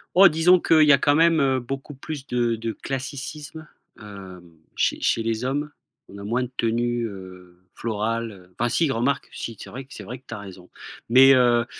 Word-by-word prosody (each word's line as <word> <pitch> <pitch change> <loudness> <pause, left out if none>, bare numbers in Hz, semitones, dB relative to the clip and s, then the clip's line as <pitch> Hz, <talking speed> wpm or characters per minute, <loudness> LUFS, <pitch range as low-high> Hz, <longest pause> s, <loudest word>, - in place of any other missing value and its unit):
Oh 195 +1 +9
disons 175 +3 +4
qu'il 160 -2 +4
y 150 - +6
a 140 - +7
quand 145 +1 +2
même, 165 +1 +4
heu, 135 -2 +2
beaucoup 135 +4 -6
plus 140 0 -8
de 120 -1 0
de 115 0 -4
classicisme, 140 +3 -6 0.3
hem, 95 -4 -11 0.2
chez - - 0
chez 115 - 0
les 115 +1 -2
hommes. 145 +3 -2 0.4
On 100 - -11
a 100 - -9
moins 120 +4 0
de 125 - -7
tenues, 120 +1 0
heu, 90 -3 -12 0.2
florales 115 +1 -2
heu, 90 -2 -17
enfin 120 - +2
si, 150 +4 +1
remarque, 125 +3 -1
si, 115 - -6
c'est - - -10
vrai 130 +1 -9
c'est - - -10
vrai 125 +1 -8
que 130 - -37
tu - - -7
as 105 - -6
raison. 95 -3 -12 0.4
Mais, 130 +3 +7
heu, 120 -2 +3
120 Hz, 205 wpm, -23 LUFS, 110-140 Hz, 0.4 s, Oh